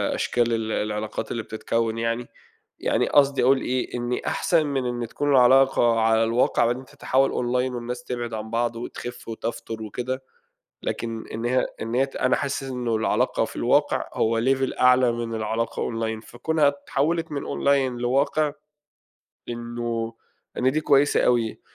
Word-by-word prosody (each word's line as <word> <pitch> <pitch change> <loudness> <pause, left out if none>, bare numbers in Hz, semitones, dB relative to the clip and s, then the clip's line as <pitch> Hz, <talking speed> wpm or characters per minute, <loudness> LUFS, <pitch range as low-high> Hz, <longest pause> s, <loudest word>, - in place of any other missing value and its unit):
أشكال 120 -1 +1
ال 110 -1 -1
العلاقات 105 0 -3
اللي 115 - -3
بتتكوّن 115 +1 -2
يعني، 115 +1 -2 0.5
يعني - - +1
قصدي 140 -2 +4
أقول 130 +2 +4
إيه، 130 -1 -2
إن 120 0 -2
أحسن 165 -3 +2
من 135 -3 -1
إن 120 -1 -2
تكون 145 +5 -2
العلاقة 130 -3 +5
على 110 0 +3
الواقع 115 +1 +2
بعدين 120 +3 -1
تتحول 135 +1 +1
Online 125 +1 0
والناس 125 +1 -5
تبعد 120 -2 -4
عن 110 0 -5
بعض 115 0 0
وتخف 120 +1 -7
وتفتُر 115 0 -5
وكده، 130 +5 -4 0.6
لكن 115 -1 -4
إن 115 +2 -4
هي 125 +1 +2 0.2
إن 115 +2 -4
هي 135 +2 +3
ت 135 - -12
أنا 130 - +2
حاسس 140 -1 -2
إنه 125 -4 -2
العلاقة 110 - +1
في - - -8
الواقع - - +2
هو 115 0 +1
level 135 +2 0
أعلى 125 -1 +5
من 115 -1 -4
العلاقة 110 +2 -2
Online، 110 -1 -3
فكونها 150 +4 +1
اتحولت 150 +3 -1
من 145 - -2
Online 135 -3 +1
لواقع، 140 +4 +1 1.0
إنه 120 -1 -3 0.4
إن 130 - +3
دي 155 - +1
كويسة 145 -1 +4
أوي، 120 -3 +1
120 Hz, 155 wpm, -24 LUFS, 115-130 Hz, 1.0 s, العلاقة